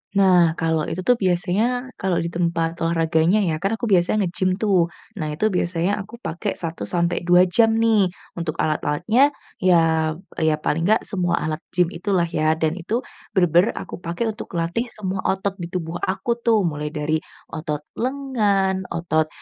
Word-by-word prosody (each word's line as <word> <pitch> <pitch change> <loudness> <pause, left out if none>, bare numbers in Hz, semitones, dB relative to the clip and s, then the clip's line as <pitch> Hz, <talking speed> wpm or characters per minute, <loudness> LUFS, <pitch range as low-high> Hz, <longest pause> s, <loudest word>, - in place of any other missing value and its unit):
Nah, 180 -4 +5
kalau 160 -2 0
itu 185 +2 -4
tuh 245 +2 +3
biasanya, 205 +8 0
kalau 190 -2 0
di 170 - -3
tempat 170 -1 -1
olahraganya 165 +4 +2
ya, 160 -3 -1
kan 195 +5 0
aku 225 -1 -3
biasanya 190 +3 +3
ngegim 185 +1 0
tuh, 190 -5 +2 0.3
nah 155 - -2
itu 165 +9 0
biasanya 180 +3 0
aku 215 +4 -8
pakai 175 +6 -3
1-2 175 +1 +1
jam 225 +5 +3
nih. 225 -3 +4 0.3
Untuk 160 -2 -3
alat-alatnya, 180 - +1 0.2
ya 160 -3 +3 0.2
ya 160 -1 +3
paling 165 +4 0
enggak 220 - +3
semua 180 -4 -1
alat 155 0 -2 0.2
gim 180 -1 +3
itulah 180 0 0
ya 155 -1 +1
dan 160 +3 -1
itu, 225 +9 -2 0.3
bener-bener 175 +2 +3
aku - - -7
pakai 175 +7 -2
untuk 215 - -8
latih 170 +9 -1
semua 195 -4 -4
otot 195 +1 -1
di 170 - -4
tubuh 175 -1 -4
aku 235 +5 -1
tuh, 230 -3 +3
mulai 150 -3 -2
dari 155 0 -1 0.3
otot 150 -1 -4 0.2
lengan, 210 -8 0
otot, 160 -2 0
180 Hz, 160 wpm, -22 LUFS, 165-205 Hz, 0.3 s, Nah